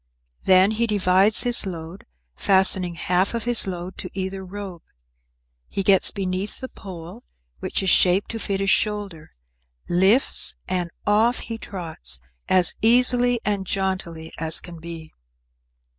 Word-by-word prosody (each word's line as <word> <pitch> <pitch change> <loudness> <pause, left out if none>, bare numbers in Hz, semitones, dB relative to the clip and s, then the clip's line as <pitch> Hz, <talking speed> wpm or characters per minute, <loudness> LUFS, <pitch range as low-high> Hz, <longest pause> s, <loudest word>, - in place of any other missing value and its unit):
Then 190 +2 +5
he 230 +2 0
divides 200 +1 +3
his 240 -4 +2
load, 170 0 -8 0.3
fastening 190 -2 +3
half 180 +5 0
of 230 - -3
his 240 -4 +2
load 180 0 -6
to - - -6
either 190 0 -4
rope. 190 -2 -8 0.9
He 195 - -3
gets 190 0 +4
beneath 190 0 -4
the 260 - -7
pole, 185 +4 -10 0.4
which - - -2
is 190 - +2
shaped 185 +2 +3
to 225 - -5
fit 195 -2 -2
his 195 0 +2
shoulder, 200 -7 -2 0.6
lifts, 190 +9 +2
and 180 -2 -1 0.2
off 220 +4 +2
he 225 -1 -7
trots 160 - -6 0.3
as 185 -1 +4
easily 245 +1 +4
and 200 -2 -1
jauntily 185 -5 -3
as 160 0 -1
can 170 -2 -11
be. 165 -1 -9
190 Hz, 140 wpm, -23 LUFS, 180-210 Hz, 0.9 s, Then